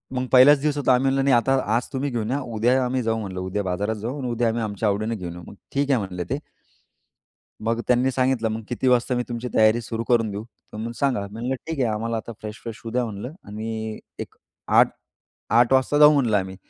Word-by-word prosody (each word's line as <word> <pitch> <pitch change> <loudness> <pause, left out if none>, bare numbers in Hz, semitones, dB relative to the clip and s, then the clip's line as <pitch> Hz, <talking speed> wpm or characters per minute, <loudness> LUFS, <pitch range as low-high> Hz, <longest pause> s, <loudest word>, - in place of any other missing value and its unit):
मग 130 0 -1
पहिलाच 135 +2 +7
दिवस 150 -1 0
होता. 135 -2 +3
आम्ही 125 +2 +2
म्हणलं 135 0 +2
नाही 135 -3 +4
आता 125 +3 +2 0.2
आज 120 - 0
तुम्ही 135 +2 -1
घेऊन 115 0 -2
या, 140 - 0 0.2
उद्या 125 +4 +3
आम्ही 130 +1 -1
जाऊ. 115 0 0
म्हटलं 95 -3 -5
उद्या 95 +2 -2
बाजारात 100 +4 -1
जाऊ 120 +7 -5
आणि 125 -2 -3
उद्या 120 0 +1
आम्ही 115 +1 -1
आमच्या 105 0 -1
आवडीने 110 +3 -1
घेऊन 90 -4 -6
येऊ. 85 0 -10
मग - - -11 0.2
ठीक 140 0 +1
आहे 125 - +3
म्हणले 90 -3 -4
ते. 135 +3 -1 1.2
मग 115 +1 -1
त्यांनी 125 +2 +3
सांगितलं, 130 -3 +1
मग 110 +1 -3
किती 125 +2 -1
वाजता 125 0 +3
मी 125 - 0
तुमची 120 +1 -4
तयारी 110 +2 +4
सुरू 115 0 -4
करून 115 -3 +2
देऊ? 100 +2 -5 0.3
तर 110 +2 -4
सांगा. 135 -6 +1
मी 110 - -8
म्हटलं, 135 - 0 0.2
ठीक 155 - -4
आहे, 120 -3 +2
आम्हाला 115 +1 -2
आता 115 - -6
फ्रेश 105 0 -7
फ्रेश 115 -2 -7
होऊ 115 - -6
द्या 125 -1 +1
म्हटलं 110 +6 -6
आणि 110 +1 -5 0.2
एक - - -7 0.4
8-8 120 +3 0
वाजता 130 +2 +3
जाऊ 150 0 +8
म्हटलं 120 -7 +2
आम्ही. 95 0 -3
115 Hz, 225 wpm, -23 LUFS, 110-130 Hz, 1.2 s, जाऊ